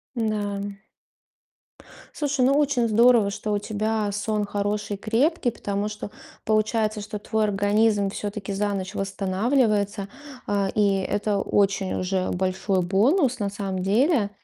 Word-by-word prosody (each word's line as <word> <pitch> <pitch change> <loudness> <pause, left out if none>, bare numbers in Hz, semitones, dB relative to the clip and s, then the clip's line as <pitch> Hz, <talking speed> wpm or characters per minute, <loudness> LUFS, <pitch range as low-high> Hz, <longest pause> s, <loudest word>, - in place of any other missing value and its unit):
Н-да. 205 -3 -2 1.3
Слушай, 285 -4 0
ну, 275 - +4
очень 275 -5 +2
здорово, 230 -1 +5
что 210 +1 -3
у - - +2
тебя 215 0 -1
сон 210 +1 -1
хороший, 205 0 -2
крепкий, 245 - +1
потому 205 -1 -3
что 210 -1 -7 0.3
получается, 215 0 +1
что 210 0 -6
твой 220 +1 0
организм 205 0 +2
все-таки 205 0 -5
за 205 +1 0
ночь 195 +1 -4
восстанавливается. 200 +1 0 0.4
А, 200 -1 0
и 200 -2 +3
это 205 +2 -1
очень 195 -1 +1
уже 185 0 -1
большой 185 +1 0
бонус, 245 - +2
на 200 -1 -1
самом 195 -2 -4
деле. 220 - +2
205 Hz, 130 wpm, -24 LUFS, 200-220 Hz, 1.3 s, здорово